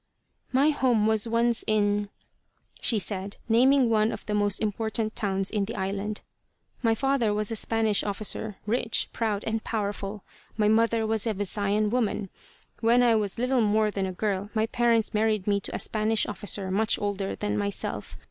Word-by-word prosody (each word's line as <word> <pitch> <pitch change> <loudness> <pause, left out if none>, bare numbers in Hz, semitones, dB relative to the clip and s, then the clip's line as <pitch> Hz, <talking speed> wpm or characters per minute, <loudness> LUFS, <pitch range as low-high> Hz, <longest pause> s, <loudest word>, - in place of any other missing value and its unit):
"My 275 +4 +4
home 245 -7 +2
was 220 0 +2
once 230 0 +1
in 205 -1 +1 0.3
," - - -27
she 230 - +2
said, 200 -1 -2
naming 255 +3 +4
one 220 -1 +2
of - - -7
the 210 - -3
most 205 -1 +1
important 220 +1 -2
towns 195 -2 0
in 210 -2 0
the 225 - -6
island. 200 +2 -3 0.6
"My 225 -2 +2
father 270 -3 +1
was 210 +1 -1
a - - -1
Spanish 220 -1 +1
officer, 210 +1 -3
rich, 225 +1 0
proud 215 -3 -1
and 220 0 -2
powerful. 205 -2 -3 0.3
My 210 -1 +3
mother 225 +1 +3
was 220 0 0
a 220 - 0
Visayan 205 +1 0
woman. 215 -5 -1 0.5
When 240 +2 +4
I 235 -1 +5
was 210 -2 0
little 250 +1 +1
more 215 0 +2
than 195 -2 -2
a - - -3
girl, 200 +1 -2
my 220 0 +2
parents 230 -1 +1
married 215 -2 +1
me 200 -1 +2
to - - -6
a - - 0
Spanish 215 0 0
officer 200 -1 -2
much 215 +4 +2
older 200 -1 -2
than 105 0 -2
myself. 100 -1 -3
215 Hz, 175 wpm, -27 LUFS, 205-225 Hz, 0.6 s, I